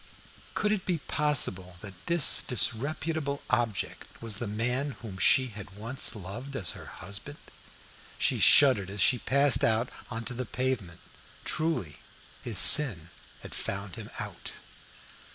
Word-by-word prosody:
Could 210 - 0
it 205 -3 -1
be 180 -2 0
possible 110 - -1
that 95 -3 -12
this 170 -4 +4
disreputable 140 +5 0
object 115 -5 -3
was 115 -3 -2
the 120 - -4
man 125 +6 -2
whom 95 -4 -8
she 130 +3 +4
had 100 -3 -11
once 115 +4 -2
loved 110 +8 -8
as 95 -9 -1
her - - -11
husband? 105 +9 -7 0.8
She - - 0
shuddered 125 -10 +5
as 100 +1 -8
she 125 +6 +3
passed 140 +2 +3
out 115 +2 +1 0.2
on 115 -2 -6
to - - -4
the 125 0 -5
pavement. 115 -8 -3 0.4
Truly, 155 - -2 0.5
his - - -3
sin 95 - +7 0.3
had - - -10
found 100 -1 -5
him - - -9
out. - - -7
120 Hz, 140 wpm, -28 LUFS, 100-140 Hz, 0.8 s, sin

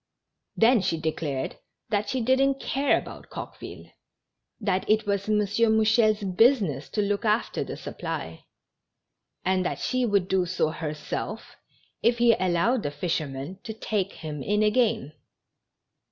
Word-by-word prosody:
Then 230 0 +5
she 165 -3 0
declared 155 -4 -3 0.3
that 205 -1 0
she 260 +2 -1
didn't 265 +3 +2
care 275 +1 +1
about - - -8
Coqueville; - - -9 0.7
that 195 -4 -1
it 215 +1 +3
was 200 0 -1
M. 215 - +3
Mouchel's 220 +1 +3
business 190 - +2
to 210 - 0
look 200 +1 -1
after 215 +1 +1
the - - -7
supply, - - -6 1.0
and 185 0 +2
that - - -2
she 255 -1 0
would 200 -4 +2
do 190 -2 +1
so 170 -3 +1
herself, 155 +7 -5 0.5
if 235 +1 +3
he 235 -1 +5
allowed 185 +6 +1
the 145 - -2
fishermen 145 +1 -3
to 220 - -6
take 205 -3 -2
him 150 -3 -6
in 210 +7 +1
again. 220 - +1
205 Hz, 140 wpm, -26 LUFS, 180-225 Hz, 1.0 s, Then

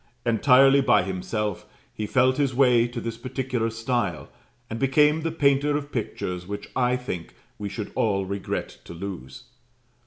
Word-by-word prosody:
Entirely 135 +4 +5
by 125 -7 +4
himself, 95 +2 -3 0.3
he 105 - -4
felt 130 +3 +3
his 140 -3 0
way 125 -3 +4
to 120 0 -6
this 115 0 -5
particular 130 -2 -2
style, 115 -6 -2 0.4
and 115 -1 -5
became 150 +4 +3
the 165 +1 -2
painter 145 -1 +2
of 145 0 -7
pictures 90 -6 -4
which 100 0 -6
I 125 -1 +2
think 110 -10 -6 0.2
we 105 -1 -4
should 100 +1 -6
all 100 -3 +1
regret 100 +1 -4
to 85 - -9
lose. 90 -7 -7
120 Hz, 155 wpm, -25 LUFS, 100-135 Hz, 0.4 s, Entirely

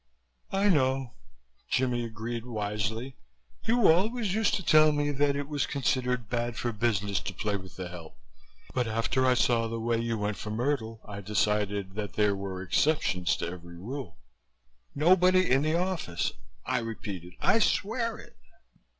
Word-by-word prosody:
"I 195 +1 +2
know," 130 - +2 0.6
Jimmie 125 -2 +1
agreed 115 +1 -5
wisely. 110 +3 -3 0.5
"You 235 -1 +4
always 205 +4 +3
used 220 0 +2
to 190 - -4
tell 155 0 +6
me 145 0 0
that 145 0 +2
it 140 0 -3
was 145 -3 -1
considered 125 -3 0
bad 120 -1 -2
for 120 - -1
business 105 -3 0
to 95 - -6
play 105 +2 -1
with 95 -3 -8
the 95 -1 -5
help 85 -3 -10 0.6
but 125 -2 0
after 115 +4 +1
I 125 - +4
saw 115 0 +2
the 115 0 -4
way 115 0 0
you 115 -1 -1
went 105 -1 -2
for 105 - -6
Myrtle 115 -1 -1
I 100 -1 -6
decided 105 -1 0
that 105 -1 -4
there 105 -1 +2
were 95 -1 -5
exceptions 100 - +1
to - - -3
every 85 -1 -8
rule." 130 +9 -6 0.8
"Nobody 185 +4 +5
in 135 +1 +5
the 155 +2 +1
office," 170 - -1 0.3
I 130 - +1
repeated. 100 -6 -6
"I 225 - +4
swear 230 +2 0
it." - - -14
120 Hz, 160 wpm, -29 LUFS, 105-145 Hz, 0.8 s, tell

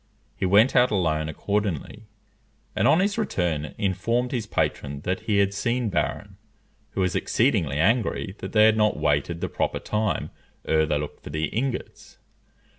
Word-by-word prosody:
He 95 - -1
went 105 +7 +5
out 125 0 +5
alone 80 -6 0
accordingly, 100 +3 -3 0.7
and - - +2
on 165 - +5
his 200 +3 0
return 85 - -2
informed 115 +5 0
his 115 -5 -2
patron 70 -7 -2
that 95 +4 -2
he 105 -2 0
had 100 0 +2
seen 120 +3 -1
Barron, 90 - -2 0.6
who 95 - -1
was 90 -1 +1
exceedingly 100 - +1
angry 105 +2 +1
that - - -6
they 105 -1 +5
had 110 0 +4
not 105 -1 +2
waited 75 +4 0
the - - -1
proper - - -2
time 105 -1 -2 0.3
ere 80 -1 +2
they 75 -1 +1
looked 75 0 -6
for - - -8
the 80 +2 -1
ingots. 125 +3 -4
100 Hz, 165 wpm, -25 LUFS, 80-115 Hz, 0.7 s, went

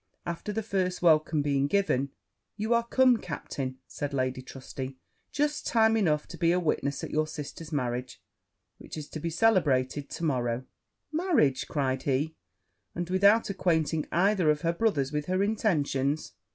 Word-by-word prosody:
After 170 +4 -4
the 220 +1 -2
first 185 -4 -1
welcome 155 -2 +4
being 140 -1 +1
given 145 -6 +1 0.5
'You 220 +2 +1
are 235 0 +1
come, 255 -1 +5
captain,' 135 -7 -5
said 145 -1 -4
Lady 130 -1 -1
Trusty, 130 0 -7 0.3
'just 295 0 -1
time 225 -1 +4
enough 155 -9 +2
to - - -9
be 170 -1 +3
a 180 - +3
witness 145 -4 -1
of - - -5
your 155 0 +1
sister's 155 +1 -7
marriage, 125 -3 -2 0.6
which - - -9
is 150 -1 -6
to 155 - -6
be 165 +2 -2
celebrated 150 - +2
to 170 - -6
morrow.' 125 -4 0 0.5
'Marriage!' 310 - +2
cried 130 -3 -1
he; 145 +3 0 0.6
'and 175 +1 -3
without 200 +3 +4
acquainting 160 -4 0
either 185 -1 +3
of 150 -1 +2
her 165 0 +1
brothers 170 -9 +1
with 150 -1 -2
her 185 +2 +1
intentions! 155 -9 0
155 Hz, 160 wpm, -28 LUFS, 140-200 Hz, 0.6 s, come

